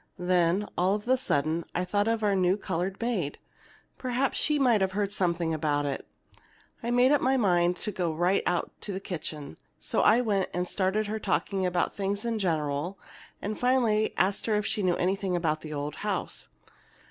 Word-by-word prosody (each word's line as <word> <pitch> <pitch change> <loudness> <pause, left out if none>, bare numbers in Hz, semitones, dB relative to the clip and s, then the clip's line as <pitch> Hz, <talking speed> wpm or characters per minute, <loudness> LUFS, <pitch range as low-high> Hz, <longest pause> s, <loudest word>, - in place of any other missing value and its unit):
Then, 180 +2 +2
all 185 +3 +3
of 210 +2 -6
a 260 - +5
sudden, 160 - 0
I 180 - 0
thought 205 +3 +1
of 225 -1 0
our 205 -1 +3
new 185 +1 +2
colored 185 0 -3
maid. 210 -12 -1 0.6
Perhaps 255 +1 0
she 300 -1 +2
might 245 -7 +3
have 190 0 +1
heard 200 0 -1
something 170 -4 0
about 145 -2 0
it. 140 -1 -4 0.7
I 235 - -3
made 245 +2 +4
up 290 - +4
my 265 +1 +3
mind 175 -5 +2
I'd 210 - -2
go 175 -3 -1
right 175 +5 +2
out 175 -1 0
to 205 - -4
the 190 - -3
kitchen. 155 - -6 0.2
So - - 0
I 220 +3 +5
went 200 -5 0
and 180 0 -1
started 200 +3 0
her 215 +1 -3
talking 195 -2 0
about 180 -1 0
things 200 +2 -2
in 230 -2 -1
general 160 0 -1 0.5
and 210 +1 -3
finally 240 -4 +2
asked 195 +4 +1
her 220 - +2
if 210 0 0
she 210 - -1
knew 180 -2 +2
anything 190 0 0
about 155 -3 0
that 155 - -8
old 145 0 -4
house. - - -3
190 Hz, 195 wpm, -28 LUFS, 175-215 Hz, 0.7 s, a